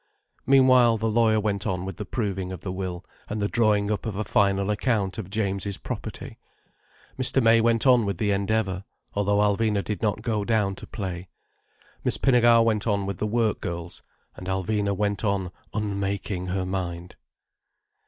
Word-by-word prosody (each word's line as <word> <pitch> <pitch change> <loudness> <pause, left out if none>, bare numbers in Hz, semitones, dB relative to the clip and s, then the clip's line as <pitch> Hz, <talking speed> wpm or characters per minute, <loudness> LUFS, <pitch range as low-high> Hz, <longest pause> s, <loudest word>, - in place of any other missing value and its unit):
Meanwhile, 130 -3 +6
the 110 +1 -1
lawyer 110 -1 +3
went 105 -1 -1
on 90 -2 -2
with 95 -3 -6
the - - -6
proving 95 -6 -2
of 95 - -7
the 95 - -4
will 95 -1 -5 0.2
and 110 - -3
the 100 - +1
drawing 105 -2 +2
up 105 +1 -2
of 105 - -3
a 105 - -1
final 100 -1 +2
account 105 -2 0
of 95 -4 -6
James's 100 -1 -2
property; - - -7 0.8
Mr. 130 +1 +2
May 115 -2 +5
went 115 +1 +2
on 125 -3 +6
with 100 -3 -2
the 105 +1 0
Endeavour, 100 -1 0 0.3
though 100 0 +1
Alvina 105 0 +2
did 105 - -4
not 105 -2 -1
go 110 -3 0
down 105 -3 +1
to - - -9
play; 95 -4 -5 0.8
Miss - - +1
Pinnegar 120 -3 +5
went 110 -1 +1
on 100 -2 +1
with 100 -2 -4
the 105 - -1
work 110 0 0
girls: 85 0 -5 0.3
and 90 - -9
Alvina 100 +1 -1
went 100 0 -1
on 100 -4 0 0.2
unmaking 100 -3 -2
her 95 +1 -1
mind. 90 -2 -4
100 Hz, 175 wpm, -25 LUFS, 95-110 Hz, 0.8 s, Meanwhile